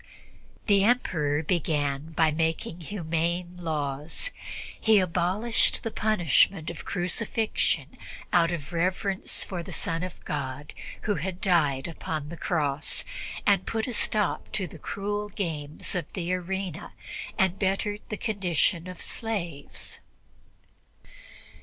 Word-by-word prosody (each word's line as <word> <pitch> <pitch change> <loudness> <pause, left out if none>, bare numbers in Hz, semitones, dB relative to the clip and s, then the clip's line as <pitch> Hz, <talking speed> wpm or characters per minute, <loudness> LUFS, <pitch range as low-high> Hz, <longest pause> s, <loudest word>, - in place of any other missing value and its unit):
The 200 -2 +5
Emperor 160 -11 +2
began 150 -2 0
by 160 0 +4
making 160 +2 -1
humane 170 0 -1
laws. 155 - -1 0.5
He 220 -1 +5
abolished 185 +5 +3
the 225 - -2
punishment 180 - +3
of 170 - -9
crucifixion 215 +5 0 0.3
out 170 -1 +6
of 165 -2 -4
reverence 185 +3 +1
for 180 -3 -4
the - - -8
Son 165 0 -1
of 180 -1 -6
God, 140 0 -3 0.3
who 210 - +2
had 180 +3 -3
died 150 -8 +3
upon 155 -2 -4
the 170 - -5
Cross, 150 -4 +1 0.6
put 220 -1 0
a 250 - -3
stop 210 -4 +1
to 195 - 0
the 165 -1 -10
cruel 205 +5 -2
games 155 -7 -2
of 180 -2 -2
the 180 -1 -1
arena 185 -1 -3 0.4
and 190 -2 +2
bettered 205 +2 0
the 215 - -2
condition 185 -4 +1
of 180 -1 -7
the - - -6
slaves. 175 - -3
175 Hz, 120 wpm, -28 LUFS, 160-195 Hz, 0.6 s, out